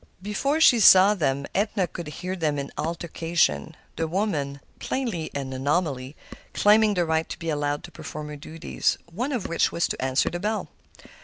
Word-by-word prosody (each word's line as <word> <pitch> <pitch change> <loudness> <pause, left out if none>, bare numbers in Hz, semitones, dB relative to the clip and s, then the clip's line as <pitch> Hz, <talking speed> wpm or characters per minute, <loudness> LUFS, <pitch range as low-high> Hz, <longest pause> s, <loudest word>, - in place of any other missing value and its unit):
Before 275 +9 0
she 250 -7 +6
saw 195 0 +8
them 140 -7 -1
Edna 200 -2 +1
could 175 -2 -8
hear 180 +5 -5
them 155 -5 -1
in 140 0 -4
altercation, 165 - -1 0.2
the 165 0 -1
woman—plainly 170 - -3
an 135 -1 -4
anomaly—claiming 155 +9 +1
the 175 -1 +2
right 160 0 0
to - - -5
be 165 -2 -3
allowed 145 -1 -1
to - - -10
perform 150 0 -7
her 150 - -6
duties, 155 +3 -2 0.2
one 250 - -2
of 245 -7 -2
which 170 - +1
was 170 - 0
to - - -4
answer 130 +1 +1
the 175 - -4
bell. 215 +3 -2
165 Hz, 165 wpm, -25 LUFS, 145-200 Hz, 0.2 s, saw